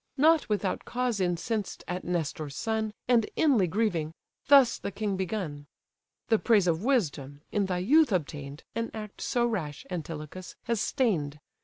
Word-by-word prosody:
Not 315 +1 +4
without 205 -3 -1
cause 245 -3 -1
incensed 190 +4 -2
at 180 +1 -3
Nestor's 155 -4 -3
son, 220 +1 -1 0.2
And 240 -3 +3
inly 255 - +4
grieving, 170 -5 -1 0.3
thus 275 -4 +6
the - - -3
king 200 0 -2
begun: 180 -7 -3 0.6
"The 225 -2 +4
praise 215 -5 +4
of 170 +1 +1
wisdom, 145 - 0
in 205 -2 +1
thy 180 -1 -1
youth 300 +2 +5
obtain'd, 145 -5 -3
An 230 +1 -2
act 215 -2 -7
so 240 -1 +1
rash, 160 -11 -3
Antilochus! 165 +1 -6
has 230 -2 -1
stain'd. 155 - 0
195 Hz, 150 wpm, -28 LUFS, 160-230 Hz, 0.6 s, thus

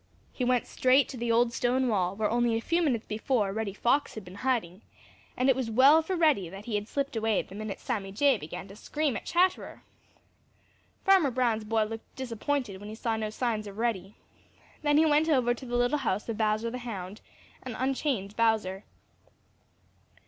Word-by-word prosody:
He 255 - -3
went 250 -1 +2
straight 260 +2 +3
to - - -7
the 235 0 -1
old 235 +1 +3
stone 250 +2 +1
wall 190 -4 0
where 215 +1 0
only 235 0 +1
a - - -1
few 335 +9 0
minutes 250 -9 0
before 215 -2 -1
Reddy 210 -2 -3
Fox 260 +7 +1
had 215 -3 -7
been 180 - -11
hiding, 220 -8 -1 0.6
and 255 - +2
it 265 - +5
was 255 -3 -2
well 270 +8 +6
for 370 +4 -3
Reddy 300 - +2
that 195 +4 -10
he 235 - -5
had 205 0 -1
slipped 280 0 -3
away 220 -2 +1
the - - -14
minute 210 0 -5
Sammy 205 -7 -3
Jay 275 +7 +3
began 180 -1 -7
to 195 - -11
scream 295 +3 -2
at - - -6
Chatterer. 365 +2 0 1.2
Farmer 380 -7 +5
Brown's 235 -4 0
boy 220 0 +1
looked 225 +1 -8
disappointed 245 -3 -3
when 205 +1 -9
he 215 - -7
saw 225 0 -1
no 215 -1 -2
signs 215 -1 -2
of 200 0 -10
Reddy. 215 -4 -2 0.7
Then 295 -1 +3
he 315 - +5
went 310 +1 +3
over 250 -5 +3
to 245 - -10
the 240 0 -1
little 245 +5 +2
house 210 -6 -2
of 230 - -2
Bowser 215 +1 0
the 250 - -5
Hound 205 -5 -7 0.4
and 255 -3 -6
unchained 260 -6 -1
Bowser. 215 -4 +1
230 Hz, 195 wpm, -28 LUFS, 210-260 Hz, 1.2 s, well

